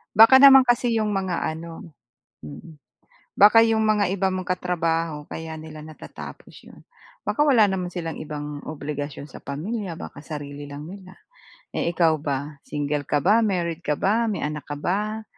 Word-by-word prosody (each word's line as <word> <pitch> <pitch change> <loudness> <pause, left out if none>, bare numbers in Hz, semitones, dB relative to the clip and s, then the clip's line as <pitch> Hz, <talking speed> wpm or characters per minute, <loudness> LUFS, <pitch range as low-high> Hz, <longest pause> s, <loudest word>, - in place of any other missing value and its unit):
Baka 225 +5 +8
naman 270 -1 +9
kasi 240 -1 +1
yung 215 -1 0
mga 190 -3 -2
ano? 165 +1 -6 0.5
Mm. 75 - -12 0.5
Baka 220 +3 +7
yung 225 -1 +2
mga 205 -3 +2
iba 195 0 0
mong 185 0 -3
katrabaho 165 -4 -2
kaya 160 +1 -7
nila 155 -1 -10
natatapos 155 0 -11
'yon, - - -16 0.4
baka - - -2
wala 270 -7 +5
naman 190 -3 -1
silang 170 -2 -6
ibang 150 -1 -6
obligasyon 145 -2 -5
sa 150 - -12
pamilya, 180 +5 -5
baka 145 - -9
sarili 145 -1 -8
lang 145 +1 -8
nila. 185 +2 -11 0.6
Eh, - - -1
ikaw 160 -3 +3
ba, 145 0 -4
single 145 -1 -3
ka 145 - 0
ba? 210 +5 +5
Married 175 -6 -1
ka 150 -4 -1
ba? 225 +7 +1
May 210 - -2
anak 150 -1 -5
ka 145 - -4
ba? 210 +8 -2
170 Hz, 165 wpm, -23 LUFS, 150-205 Hz, 0.6 s, naman